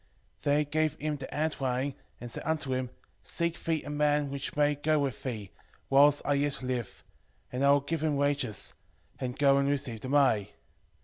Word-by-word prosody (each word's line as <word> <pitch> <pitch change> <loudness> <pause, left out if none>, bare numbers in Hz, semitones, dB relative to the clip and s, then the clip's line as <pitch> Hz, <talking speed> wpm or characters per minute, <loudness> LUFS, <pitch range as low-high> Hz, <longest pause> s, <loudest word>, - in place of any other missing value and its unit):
5:3 - - -32
Then 145 0 +4
he 150 - +2
gave 155 +1 +1
him 155 -1 -2
the 135 - -6
handwriting, 140 -3 -1 0.3
and 120 -1 -7
said - - -5
unto 155 -4 -1
him, 130 -1 -1 0.3
Seek 170 0 -2
thee 165 -2 0
a 145 - -6
man 150 -1 +1
which 140 0 -4
may 145 0 +3
go 150 +2 +1
with 140 -6 -1
thee, 110 -7 -5 0.4
whiles 145 +1 +5
I 145 - +2
yet 140 -1 0
live, 125 -2 -3 0.5
and 125 +2 -1
I 140 - +5
will 140 0 +5
give 155 +2 -3
him 155 -2 +1
wages: 140 -6 0 0.5
and 125 0 -3
go 140 -1 +5
and 140 0 +1
receive 130 -6 -2
the 130 - -5
money. 120 -8 +3
140 Hz, 195 wpm, -30 LUFS, 130-150 Hz, 0.5 s, whiles